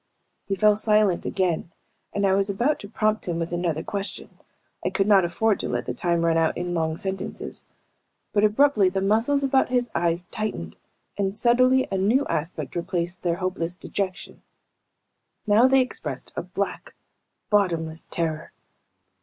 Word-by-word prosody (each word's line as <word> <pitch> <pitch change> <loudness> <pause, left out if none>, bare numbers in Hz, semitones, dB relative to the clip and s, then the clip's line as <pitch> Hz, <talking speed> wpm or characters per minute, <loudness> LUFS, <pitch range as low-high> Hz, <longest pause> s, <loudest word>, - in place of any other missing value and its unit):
He 195 - 0
fell 210 +1 +4
silent 210 -4 +2
again, 175 -3 -1 0.4
and 200 0 0
I 190 - +3
was 195 +1 +2
about 240 +10 +1
to 205 - -9
prompt 215 -1 0
him 170 -2 -1
with 170 +1 -3
another 170 -3 -1
question 200 0 -6 0.4
I - - +1
could 195 - 0
not 200 -2 +5
afford 200 +5 +1
to - - -3
let - - -2
the - - -3
time 170 -1 0
run 165 -1 +3
out 160 -1 +1
in 175 0 -3
long 160 -1 -1
silences 190 0 -5 0.7
but 205 - +3
abruptly 215 -2 +4
the 190 +1 -1
muscles 225 +9 +2
about 270 -1 +2
his 245 -2 0
eyes 170 +1 0
tightened 85 - -4 0.4
and 195 0 -1
subtly 255 +3 +4
a 190 - 0
new 230 +9 +3
aspect 155 -2 -3
replaced 175 0 -2
their 170 -2 0
hopeless 180 -2 -2
dejection. 190 +1 -5 1.0
Now 215 +4 +5
they 265 0 +5
expressed 255 - -5
a - - -2
black, - - -4 0.6
bottomless 165 -6 0
terror. 160 -2 -3
195 Hz, 160 wpm, -24 LUFS, 170-215 Hz, 1.0 s, not